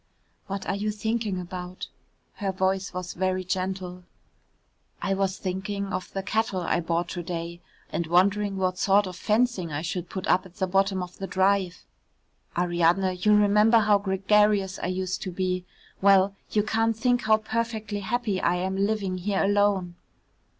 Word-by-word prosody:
"What 195 0 -4
are - - -1
you 210 +2 -2
thinking 215 -2 -2
about?" 180 0 -6 0.5
her 200 -2 -1
voice 190 +1 0
was 180 -1 -5
very 185 0 -1
gentle. 185 -1 -3 1.0
"I 195 - -1
was 195 -1 0
thinking 195 +1 -3
of 185 0 -4
the 195 - -3
cattle 215 -2 0
I 175 - 0
bought 170 0 -1
to 175 - -4
day, 170 0 -5 0.3
and 170 - -2
wondering 195 +3 +2
what 185 -1 -1
sort 200 +1 +4
of 185 -1 -6
fencing 215 -3 0
I 145 +2 -3
should 175 +1 -4
put 190 -1 -5
up 185 +1 +3
at 180 - -22
the 190 - 0
bottom 195 0 +1
of 180 0 -11
the 195 - -4
drive. 190 -1 +1 0.7
Ariadne, 175 +2 +2
you 210 +3 +4
remember 210 +2 +5
how 210 -2 +4
gregarious 195 0 +2
I - - -2
used 185 0 -2
to 185 - -4
be; 185 0 -2 0.4
well, 195 0 +5 0.2
you 210 - +1
can't 225 +1 +1
think 245 0 +1
how 215 0 +5
perfectly 220 -1 -3
happy 210 -1 -1
I 175 - +2
am 190 +2 -2
living 195 -2 -1
here 195 +1 0
alone." 200 -3 +2
190 Hz, 165 wpm, -26 LUFS, 185-205 Hz, 1.0 s, remember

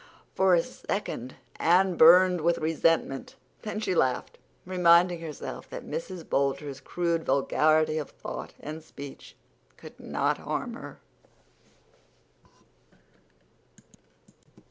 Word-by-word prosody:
For 190 -1 +4
a 165 - +2
second 130 - -5 0.2
Anne 180 +2 +3
burned 180 +2 +7
with 170 +2 +2
resentment. 165 - 0 0.3
Then 215 -1 -4
she 215 -4 -1
laughed, 130 -7 0 0.3
reminding 175 -1 +4
herself 155 -3 -7
that - - -8
Mrs. 175 0 -6
Boulter's 140 0 -1
crude 170 -2 -1
vulgarity 155 +3 +2
of 150 - -6
thought - - -8
and 155 +2 -7
speech 140 -3 -11 0.4
could - - -13
not - - -1
harm - - -4
her. - - -9
165 Hz, 100 wpm, -27 LUFS, 150-180 Hz, 0.4 s, burned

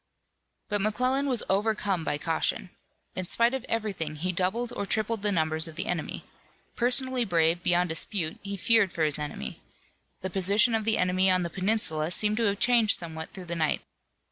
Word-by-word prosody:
But 205 -1 -1
McClellan 255 +7 +1
was 250 -4 +1
overcome 200 -3 0
by 145 - -1
caution. 165 +3 -1 0.4
In 185 -1 -3
spite 235 +5 +3
of 265 -2 -3
everything 195 -9 -2
he 180 +5 -1
doubled 200 +7 -1
or 200 - -3
tripled 220 +1 0
the 205 0 +2
numbers 160 -2 +1
of 160 - -10
the - - -2
enemy. 175 -4 -4 0.5
Personally 250 +1 +3
brave 170 -3 +1
beyond 175 0 +2
dispute, 160 +1 0
he 200 0 -5
feared 220 -2 +3
for 165 - -1
his 150 -1 0
army. 145 - -6 0.6
The 190 - -4
position 200 +5 +3
of 220 -1 0
the 220 0 +2
enemy 185 +1 +2
on 185 -1 +3
the 170 - -4
peninsula 185 -6 -1
seemed 210 +4 +2
to 230 - +1
have 200 -1 +1
changed 235 -1 +4
somewhat 160 -2 -7
through 185 -2 -9
the 170 0 -4
night. 155 -2 0
190 Hz, 185 wpm, -27 LUFS, 170-220 Hz, 0.6 s, changed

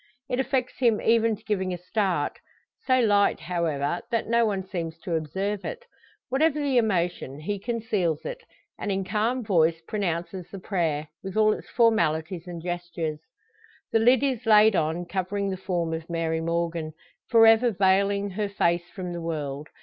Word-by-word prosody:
It 250 - -1
affects 265 -1 -1
him 235 -5 +3
even 225 -1 +3
to 215 - -20
giving 190 -4 -1
a - - -7
start; 180 -4 -1 0.5
so 255 -1 +4
light, 205 -3 +3
however, 170 -3 -1
that 230 - -1
no 235 0 +3
one 195 -2 -1
seems 165 -3 -4
to 175 - -4
observe 190 +6 -2
it. - - -6 0.4
Whatever 300 +3 +2
the 275 -4 +2
emotion, 175 - -1
he 205 +5 -3
conceals 210 -8 -1
it; - - -5 0.4
and 205 - -2
in 195 0 0
calm 225 +6 0
voice 165 -5 +2
pronounces 175 -3 -3
the 195 - -8
prayer, 165 -6 -1
with 195 +1 -6
all 215 0 +5
its - - -9
formalities 180 -7 +1
and 170 -2 -7
gestures. 175 -3 -3 0.7
The 225 - +3
lid 245 +4 +4
is 260 -5 -1
laid 215 -1 +6
on, 165 +2 0
covering 195 +2 -2
the - - -2
form 175 -3 -2
of 160 +1 -5
Mary 165 -1 -1
Morgan 165 -1 -2 0.4
for 230 -2 +7
ever 225 +2 +6
veiling 200 0 +2
her 205 +2 -2
face 175 -3 0
from 180 -3 -6
the 170 - -5
world. 150 -3 -4
190 Hz, 170 wpm, -26 LUFS, 170-220 Hz, 0.7 s, for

